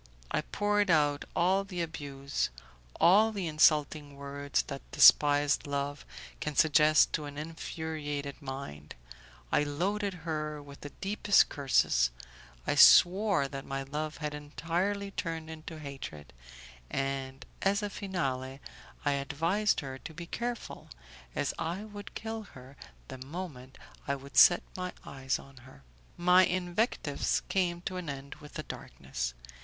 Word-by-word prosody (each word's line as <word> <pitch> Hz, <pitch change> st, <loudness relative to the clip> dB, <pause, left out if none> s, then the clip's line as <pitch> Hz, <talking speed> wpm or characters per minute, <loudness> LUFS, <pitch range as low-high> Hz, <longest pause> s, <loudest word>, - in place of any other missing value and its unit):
I -, -, +1 dB
poured 205 Hz, -1 st, 0 dB
out 145 Hz, -3 st, +3 dB
all 190 Hz, +3 st, +3 dB
the 180 Hz, -3 st, -3 dB
abuse, 140 Hz, -, -3 dB, 0.5 s
all 210 Hz, +6 st, +6 dB
the 200 Hz, -4 st, -3 dB
insulting 150 Hz, -2 st, +2 dB
words 140 Hz, 0 st, -2 dB
that 140 Hz, -, -7 dB
despised 145 Hz, -1 st, +6 dB
love 145 Hz, 0 st, -3 dB, 0.3 s
can 150 Hz, -1 st, -3 dB
suggest 155 Hz, +1 st, +5 dB
to 155 Hz, -, -1 dB
an 145 Hz, 0 st, -8 dB
infuriated 155 Hz, -2 st, -5 dB
mind; 135 Hz, -, -7 dB, 0.6 s
I -, -, +4 dB
loaded 190 Hz, +7 st, -1 dB
her 150 Hz, -2 st, -3 dB
with 140 Hz, -1 st, -12 dB
the 145 Hz, -, -7 dB
deepest 200 Hz, +4 st, +2 dB
curses; 95 Hz, -, +2 dB, 0.6 s
I -, -, +1 dB
swore 190 Hz, -4 st, +6 dB
that 135 Hz, -1 st, -6 dB
my 135 Hz, 0 st, -4 dB
love 150 Hz, +3 st, -4 dB
had 150 Hz, -2 st, -4 dB
entirely 175 Hz, +7 st, -2 dB
turned 165 Hz, -3 st, -4 dB
into 160 Hz, 0 st, -8 dB
hatred, 135 Hz, -, -8 dB, 0.6 s
and, 135 Hz, -1 st, -3 dB, 0.2 s
as 200 Hz, +2 st, +2 dB
a 205 Hz, -, -1 dB
finale, 135 Hz, -10 st, -3 dB, 0.5 s
I 145 Hz, -, +3 dB
advised 165 Hz, +9 st, +1 dB
her 135 Hz, -2 st, -7 dB
to 160 Hz, -, -9 dB
be 170 Hz, +1 st, -6 dB
careful, 235 Hz, +6 st, -5 dB, 0.5 s
as -, -, 0 dB
I 170 Hz, +5 st, -3 dB
would 205 Hz, -2 st, -10 dB
kill 225 Hz, 0 st, -4 dB
her 130 Hz, +2 st, -12 dB, 0.3 s
the 130 Hz, -, -8 dB
moment 135 Hz, -3 st, -7 dB, 0.3 s
I 140 Hz, -, +1 dB
would 140 Hz, 0 st, -12 dB
set 175 Hz, -, +7 dB
my 180 Hz, 0 st, -4 dB
eyes 135 Hz, -1 st, -2 dB
on 135 Hz, -1 st, -15 dB
her. 120 Hz, -, -15 dB, 0.3 s
My 180 Hz, +1 st, +6 dB
invectives 180 Hz, -, 0 dB
came 175 Hz, -2 st, 0 dB
to 185 Hz, +1 st, -4 dB
an 175 Hz, -4 st, -5 dB
end 140 Hz, +1 st, -6 dB
with 150 Hz, -, -12 dB
the -, -, -4 dB
darkness. 60 Hz, -2 st, -5 dB
150 Hz, 140 wpm, -30 LUFS, 140-180 Hz, 0.6 s, set